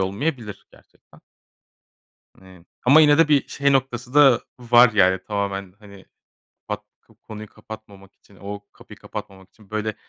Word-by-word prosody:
olmayabilir 105 +1 -4
gerçekten. - - -23 1.2
Hani, 95 -2 -18 0.2
ama 140 +5 +7
yine 150 0 +5
de 165 - +4
bir 145 -2 +2
şey 140 0 0
noktası 125 -1 -2
da 140 -5 +6 0.2
var, 120 0 +5
yani, 95 -2 +3
tamamen, 100 -2 -4
hani, 100 -2 -15 0.6
pat - - -5 0.2
ko - - -24
konuyu 110 -1 -11
kapatmamak 100 -3 -13
için, 100 - -24
o 100 +2 -8
kapıyı - - -15
kapatmamak 95 -1 -10
için, 105 -3 -23
böyle, 110 0 -3
110 Hz, 145 wpm, -22 LUFS, 100-125 Hz, 1.2 s, ama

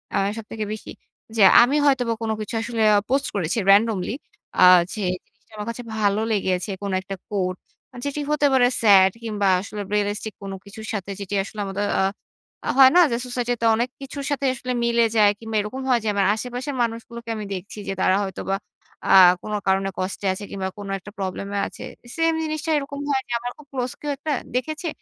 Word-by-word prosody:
আ - - +3 0.2
সবথেকে 215 -1 -5
বেশি। 215 - -8 0.4
যে, 220 - +1 0.2
আমি 250 +4 +3
হয়তোবা 250 -5 +2
কোন 220 -1 -1
কিছু 215 +2 -5
আসলে 230 -1 -3
আ - - +5
পোস্ট 275 +1 +1
করেছি 180 +2 -1
রেনডমলি। 210 -1 +3 0.5
আ - - +9 0.3
যে, 215 - -4 0.3
জিনিসটা 225 +1 -37
আমার 210 +2 -5
কাছে 245 +1 -5
ভালো 205 -1 +1
লেগেছে। 190 -1 0
কোন 200 -1 -3
একটা 195 +1 -6
quote 185 -3 -2 0.5
যেটি 285 +1 -2
হতে 295 -1 +2
পারে 245 -2 +5
স্যাড 195 -3 +7
কিংবা 210 -3 -1
আসলে 205 +2 -6
রিয়ালিস্টিক 210 +1 -1
কোন 195 -1 -6
কিছুর 215 +2 -10
সাথে 200 -2 -4
যেটি 200 0 -4
আসলে 210 +2 -9
আমাদের 200 +1 -2
আ - - +3 0.7
আ - - 0
হয় 265 -1 +9
না 360 - +8
যে, - - +1
সোসাইটিতে 245 -1 -2
অনেক 240 +3 0
কিছুর 275 +1 -6
সাথে 280 -1 -1
আসলে 255 0 -5
মিলে 235 0 +3
যায় 205 -1 +6
কিংবা 225 -1 -6
এরকম 235 +6 -5
হয় 245 -2 +4
যে, - - -3
আমার 200 -1 +2
আশেপাশের 250 +4 -5
মানুষগুলোকে 230 0 -5
আমি 210 -1 -5
দেখছি 195 +3 -7
যে, 195 - -1
তারা 185 - +4
হয়তোবা 195 0 -3 0.5
আ - - +4 0.3
কোন 210 - -6
কারণে 195 0 +2
কষ্টে 190 +2 -3
আছে 190 - -8
কিংবা 190 -1 -3
কোন 205 -1 -7
একটা 205 +3 -12
প্রবলেেমে 195 +1 -4
আছে। - - -10 0.3
সেইম 330 0 +2
জিনিসটা 310 +1 -3
এরকম 280 0 -5
হয় 270 -1 +2
যে, - - -11
আমার 245 +1 -5
খুব 300 - -16
ক্লোজ 250 -1 -2
কেউ 295 - -2
একটা 310 - -4 0.2
দেখেছে। 310 +6 -2
220 Hz, 195 wpm, -23 LUFS, 200-250 Hz, 0.7 s, আ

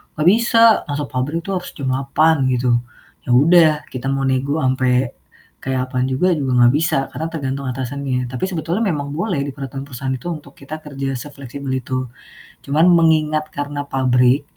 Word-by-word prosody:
"Gak 155 +2 0
bisa. 230 +2 +4 0.3
Masuk 145 0 -2
pabrik 140 +6 -2
tuh 195 -1 -1
harus 180 - -7
jam 135 -2 -4
8.00," 140 +2 +2
gitu. 125 -1 +2 0.5
Ya - - -2
udah 160 +5 +6 0.2
kita 130 0 -7
mau 135 - -1
nego 135 +4 0
sampai 130 -1 +1 0.5
kayak 130 -1 -1
apaan 125 0 0
juga 135 +8 +1
juga 135 -3 -1
nggak 120 +1 +6
bisa, 160 -2 +1
karena 160 - -4
tergantung 140 -3 -3
atasannya, 130 0 -3
tapi 125 +6 -2
sebetulnya 175 +3 -2
memang 145 -7 -2
boleh 170 +1 -2
di 140 - -3
peraturan 135 -1 -6
perusahaan 130 0 -4
itu 130 +5 -6
untuk 150 -4 -7
kita 140 +3 -8
kerja 135 -2 -4
sefleksibel 140 0 -7
itu, 130 0 -2 0.6
cuman 155 +5 +4
mengingat 155 -2 +2
karena 145 0 -4
pabrik 130 0 +2
140 Hz, 170 wpm, -19 LUFS, 130-155 Hz, 0.6 s, udah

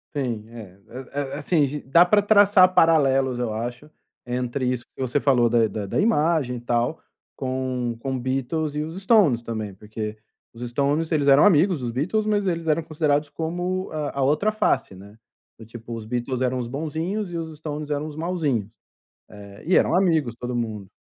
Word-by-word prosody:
Sim, 120 -7 -2
é 105 -5 -11 0.3
é 145 - -3
é, - - -3
assim, 150 0 +1
d 150 +2 -5
dá 170 +7 +5
pra 205 +3 +4
traçar 205 -3 +5
paralelos, 135 -7 +3
eu 120 -3 -2
acho, 120 +6 -5 0.4
entre 125 +1 -2
isso 125 -1 -2
que - - -8
você 130 +2 0
falou 125 -4 +3
da 115 -1 +3
da 105 -1 -5
da 95 - -2
imagem 160 - +1
e - - -6
tal, 120 +5 -1 0.3
com 130 -2 -3
com 130 +1 -3
Beatles 135 +5 -2
e 150 - -1
os 160 +4 -6
Stones 190 - +4
também, 110 -3 -5
porque 105 +1 -6 0.4
os 120 +1 -6
Stones 145 +6 0
eles 145 -3 +1
eram 140 +1 +7
amigos 180 -4 +4
os 120 - -2
Beatles, 185 - -1
mas 205 -2 0
eles 165 -2 -2
eram 155 +2 +2
considerados 150 -2 0
como 175 +5 -3
a 150 -2 -4
a - - +2
outra 155 +11 +2
face, 215 - 0
né, 100 +3 -14 0.5
tipo 115 +1 -9
os 115 -1 -6
Beatles 125 +2 -3
eram 130 0 0
os 125 -2 -3
bonzinhos 160 - -3
e - - -6
os 160 -2 -6
Stones 150 -1 -6
eram 145 +1 -2
os 150 - -8
malzinhos, 155 - -1 0.7
eh, 100 -1 -12
e 185 - +3
eram - - +3
amigos 160 -10 +2
todo 125 0 -4
mundo. 110 -5 -4
140 Hz, 190 wpm, -23 LUFS, 120-165 Hz, 0.7 s, eram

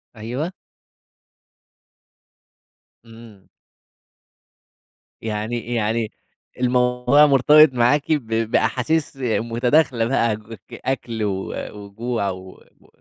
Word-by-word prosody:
أيوه. 125 +10 -4 2.5
إمم. 115 -4 -15 1.7
يعني 115 +2 -4
يعني 110 -1 -1 0.5
الموضوع 125 +3 +3
مرتبط 150 +1 +6
معاكِ 125 +6 +2
ب 145 -7 0 0.2
بأحاسيس 135 +6 0
متداخلة 120 +2 +1
بقى، 115 -3 +1 0.3
أكل 115 -4 -4
و 95 -2 -3 0.3
وجوع 110 0 -3
و 95 0 -7 0.3
و - - -23
120 Hz, 75 wpm, -21 LUFS, 110-130 Hz, 2.5 s, مرتبط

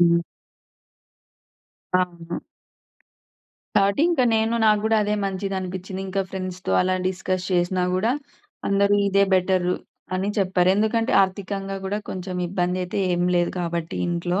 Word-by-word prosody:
హ్మ్. 170 0 +5 1.8
అవును. 170 -2 -4 1.4
కాబట్టి 200 +6 +3
ఇంకా 285 -7 +3
నేను 220 +1 +2
నాగ్గూడా 215 +1 +3
అదే 210 0 0
మంచిదనిపిచ్చింది. 190 -1 -3
ఇంకా 195 +1 -1
ఫ్రెండ్స్‌తో 185 -1 -5
అలా 185 0 +2
డిస్కస్ 185 0 -2
చేసినా 180 +1 +1
గూడా 215 +6 +2 0.6
అందరూ 200 0 +3
ఇదే 200 0 +4
బెటర్ 185 -1 +2 0.5
అని 190 +2 -1
చెప్పారు. 185 -2 +2
ఎందుకంటే, 220 +2 +1
ఆర్థికంగా 195 0 -3
గూడా 200 +2 -1
కొంచెం 185 0 -5
ఇబ్బందయితే 180 +1 -1 0.2
ఏం 175 0 +1
లేదు 175 0 +2
కాబట్టి 170 -1 -3
ఇంట్లో. 175 +2 -1
185 Hz, 115 wpm, -23 LUFS, 180-200 Hz, 1.8 s, హ్మ్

